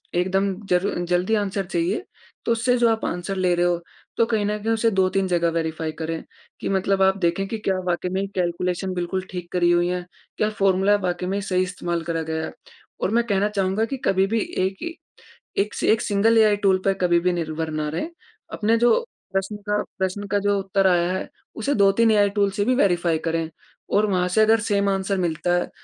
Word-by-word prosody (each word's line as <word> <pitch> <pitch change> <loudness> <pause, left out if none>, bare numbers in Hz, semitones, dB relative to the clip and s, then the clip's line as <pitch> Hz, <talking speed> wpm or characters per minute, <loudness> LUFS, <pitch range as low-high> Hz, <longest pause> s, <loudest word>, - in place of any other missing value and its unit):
एकदम 190 +2 +1
ज़रू 180 +2 +1
जल्दी 180 +5 +1
आंसर 195 -1 -2
चाहिए 335 - -1 0.4
तो - - +1
उससे 245 +2 +2
जो 240 -1 +4
आप 225 0 0
आंसर 180 +3 -3
ले 185 -1 +2
रहे 175 0 +2
हो 175 -1 +1 0.4
तो 230 - +4
कहीं 220 -3 0
न 210 +1 -1
कहीं 225 +1 +1
उसे 225 +1 +2
2-3 190 0 +1
जगह 170 -2 +2
वेरीफ़ाई 160 -1 -2
करें 160 0 -3 0.4
कि - - -2
मतलब 195 0 +1
आप 190 0 +3
देखें 185 +1 0
कि 225 - -3
क्या 195 -3 0
वाक़ई 180 +1 -1
में 195 +1 -1
कैलकुलेशन 180 +1 -1
बिल्कुल 180 +1 -2
ठीक 180 -2 -6
करी 175 -1 +3
हुई 175 0 +3
है 180 0 -3 0.3
क्या 210 - +1
फ़ॉर्मूला 195 +1 +4
वाक़ई 180 0 -2
में 200 +1 -1
सही 185 -2 +1
इस्तेमाल 175 -2 -3
करा 165 0 -2
गया, 160 0 -3 0.5
और - - 0
मैं 235 +2 +3
कहना 205 -1 +1
चाहूँगा 195 +1 0
कि 270 +4 -4
कभी 190 0 +3
भी 225 +3 0 0.3
1 190 +1 -2
ही 335 0 -4 0.7
1 210 - -12
स 220 - +3
सिंगल 215 +3 +3
एआई 215 -2 +5
टूल 190 -1 +4
पर 195 - +4
कभी 175 -1 +4
भी 180 +1 +1
निर्भर 160 -1 -3
ना 155 -1 -2
रहें 165 - -3 0.4
अपने 225 +2 +2
जो 240 - +4 0.3
प्रश्न 195 +2 -1
का 210 0 +2 0.2
प्रश्न 190 +2 -2
का 205 +1 +1
जो 205 0 +3
उत्तर 195 0 +1
आया 175 -1 +2
है 190 - -3 0.3
उसे 225 +6 -1
2-3 200 +3 +4
या 215 - +4
एआई 205 - +3
टूल 200 -1 +3
से 205 +1 -1
भी 255 +2 +2
वेरीफाई 175 - +2
करें 165 -1 -1 0.4
और 210 +1 +4
वहाँ 180 -1 +1
से - - +7
अगर 220 +1 +4 0.3
आंसर 195 0 -1
मिलता 175 -1 0
है 175 - -1
190 Hz, 210 wpm, -23 LUFS, 175-210 Hz, 0.7 s, से